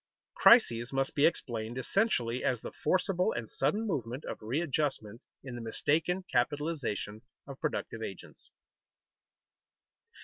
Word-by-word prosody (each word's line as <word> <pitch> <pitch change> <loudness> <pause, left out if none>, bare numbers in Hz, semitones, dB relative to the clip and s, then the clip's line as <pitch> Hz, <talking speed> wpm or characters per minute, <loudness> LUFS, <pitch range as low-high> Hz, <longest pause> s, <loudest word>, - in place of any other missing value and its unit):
_Crises 120 - +6
must 135 0 0
be 145 - +5
explained 120 -7 -3
essentially 130 - 0
as 125 -3 +1
the - - -6
forcible 185 -1 +1
and 115 -2 -4
sudden 210 - 0
movement 130 - -3
of - - -6
readjustment 130 -3 -2 0.2
in 130 -2 -7
the 120 - -6
mistaken 160 +10 0
capitalization 135 - -1 0.2
of 135 -1 -10
productive 145 -7 -3
agents. 95 -4 -8
135 Hz, 115 wpm, -31 LUFS, 115-165 Hz, 0.2 s, Crises